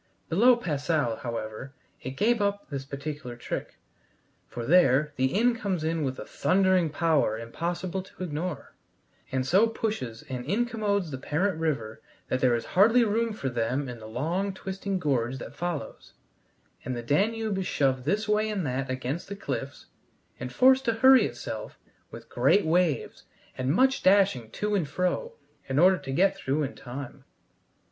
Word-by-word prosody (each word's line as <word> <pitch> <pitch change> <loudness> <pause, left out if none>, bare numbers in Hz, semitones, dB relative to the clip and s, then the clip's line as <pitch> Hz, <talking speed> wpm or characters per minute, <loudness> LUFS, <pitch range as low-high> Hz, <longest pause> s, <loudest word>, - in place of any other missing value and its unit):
Below 235 +9 +5
Passau, 150 - -1
however, 115 +3 -6 0.3
it 130 +1 -6
gave 230 +1 +2
up 200 -3 -1
this 135 -1 -4
particular 140 -2 -6
trick, 120 - -5 0.7
for 120 - -6
there 150 -2 +4
the 130 -1 +2
Inn 235 +3 +3
comes 195 -8 -2
in 160 0 -1
with 130 -2 -2
a - - -7
thundering 185 -3 +2
power 150 -7 +1
impossible 170 +10 -3
to 185 0 -10
ignore, 160 -2 -4 0.6
and 130 -1 0
so 190 +11 +4
pushes 210 - -4
and 125 -2 -5
incommodes 205 - -1
the 130 - -5
parent 160 +6 -1
river 125 -9 -2 0.3
that 130 - 0
there 125 -2 +4
is 115 - -3
hardly 225 +6 +5
room 225 +1 +1
for 210 -10 -4
them 125 +3 -1
in 120 -2 -7
the 110 - -10
long 170 - -2
twisting 195 0 -3
gorge 130 -6 0
that - - -8
follows, 175 -4 -5 0.7
and 125 0 -3
the 120 - -5
Danube 205 - 0
is 185 - -2
shoved 130 -2 +1
this 205 +9 0
way 210 +1 +2
and 200 -6 -2
that 130 0 -2
against 130 +7 -3
the 200 - -4
cliffs, 140 -6 -5 0.5
and 125 +1 -5
forced 260 - +5
to 230 - +2
hurry 260 +4 +6
itself - - -7 0.3
with - - -11
great 205 - +3
waves 165 -2 0 0.3
and 130 +1 -1
much 260 - +3
dashing 185 - +3
to 210 - -2
and 175 -8 0
fro 185 - -1 0.4
in 135 - -1
order 185 +3 +5
to 135 - -6
get 190 +7 +3
through 150 -5 -1
in 140 - -3
time. 130 +1 -8
160 Hz, 165 wpm, -27 LUFS, 130-200 Hz, 0.7 s, hurry